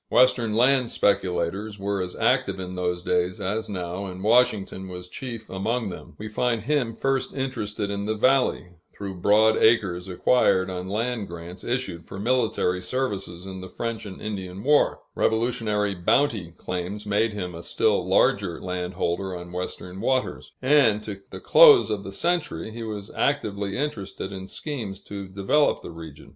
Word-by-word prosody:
Western 125 -3 +4
land 125 +1 +4
speculators 100 +1 0
were 100 0 -1
as 90 -1 -4
active - - +1
in 90 0 -5
those 90 -1 -2
days 90 +1 0
as 105 +4 -2
now, 90 0 -4
and 95 0 -7
Washington 110 -4 +2
was 90 -1 -7
chief 115 +2 -7
among 110 +4 -1
them. - - -10
We 110 - -6
find 115 0 0
him 125 -4 0
first 135 +2 -1
interested 110 -6 -2
in 100 0 -3
the 110 - 0
valley, 130 -5 +2 0.3
through 100 -2 -5
broad 110 +3 +5
acres 95 -6 +3
acquired 95 -1 +3
on 90 0 -5
land 115 0 -1
grants 85 +2 -9
issued 120 -9 -3
for - - -8
military 110 -5 +1
services 95 -5 -3
in 95 -1 -7
the 95 - -8
French 115 +2 -4
and 95 - -9
Indian 95 -2 -5
War; 145 +2 +3
Revolutionary 110 -3 +1
bounty 95 - +1
claims 90 +3 -4
made 105 +2 +1
him 90 -4 -4
a 85 - -7
still 100 +2 +1
larger 95 0 +2
landholder 90 0 -2
on 90 0 -9
Western 90 +1 -5
waters; 130 +2 -1
and, 130 -7 +4
to 100 -2 -7
the - - -8
close 455 -5 +7
of 100 -2 -2
the 95 - -7
century, 155 - -1
he 115 +1 -7
was 105 -2 -6
actively 100 -8 0
interested 105 -9 -4
in 95 -1 -7
schemes 110 -11 -5
to 100 -1 -7
develop 100 +10 +1
the - - -7
region. 80 -3 -11
100 Hz, 160 wpm, -25 LUFS, 95-115 Hz, 0.3 s, close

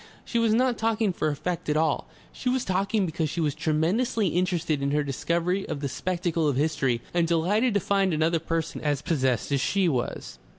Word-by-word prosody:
She 235 - 0
was 230 -1 +3
not 245 +1 +2
talking 220 -3 +1
for 155 - -1
effect 155 +3 -3
at 150 - +2
all, 155 -2 +1 0.3
she 250 - -2
was 255 0 0
talking 195 +2 +1
because 160 -2 -2
she 170 - -4
was 150 -3 +1
tremendously 175 - +1
interested 170 -3 0
in 140 - 0
her 150 +1 +1
discovery 170 +7 -1
of 140 - -3
the 140 - -2
spectacle 170 +2 -1
of 145 - +1
history, 135 -5 0
and 170 -1 +2
delighted 200 +8 +2
to - - +4
find 195 0 +1
another 160 +1 +1
person 165 0 -3
as 145 -1 -1
possessed 135 -7 0
as 140 -1 +2
she 195 +6 +2
was. 130 -7 -3
165 Hz, 200 wpm, -26 LUFS, 150-195 Hz, 0.3 s, to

